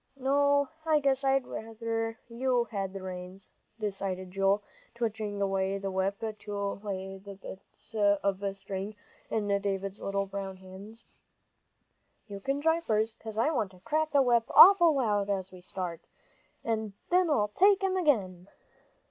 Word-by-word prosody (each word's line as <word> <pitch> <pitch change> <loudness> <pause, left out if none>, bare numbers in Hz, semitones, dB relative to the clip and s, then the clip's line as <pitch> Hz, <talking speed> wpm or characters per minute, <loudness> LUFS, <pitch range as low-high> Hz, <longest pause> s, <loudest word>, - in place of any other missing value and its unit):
"No, 285 +1 +3 0.2
I 315 -1 +3
guess 275 -1 +1
I'd 270 -1 +2
rather 225 0 -4
you 245 +1 +1
had 195 -3 -2
the 195 -1 -7
reins," 185 +1 -8 0.3
decided 195 -3 -3
Joel, 195 +2 +2 0.3
twitching 215 -3 -3
away 195 0 0
the 195 0 -4
whip 190 +2 -1 0.2
to 200 -1 -4
lay 195 -1 -5
the 200 0 -10
bits 195 +3 -12
of 200 -2 +1
string 195 +2 -5 0.3
in 215 -2 -1
David's 195 0 -3
little 195 0 -1
brown 195 -1 -6
hands. 190 +4 -12 1.2
"You 200 -2 -8
can 275 +7 -1
drive 325 +2 +1
first, 220 0 0
'cause 220 -1 -8
I 235 +8 +2
want 230 -10 0
to 185 - -17
crack 310 +5 0
the 280 -1 +5
whip 240 -2 +3
awful 345 -5 +9
loud 205 -6 +1
as 190 -2 -2
we 185 -1 -12
start. 180 -2 -5 0.6
And 220 -2 -2 0.2
then 360 -1 +4
I'll 210 -9 +2
take 390 - +4
'em 380 -1 +1
again." 200 - +1
205 Hz, 150 wpm, -29 LUFS, 195-255 Hz, 1.2 s, awful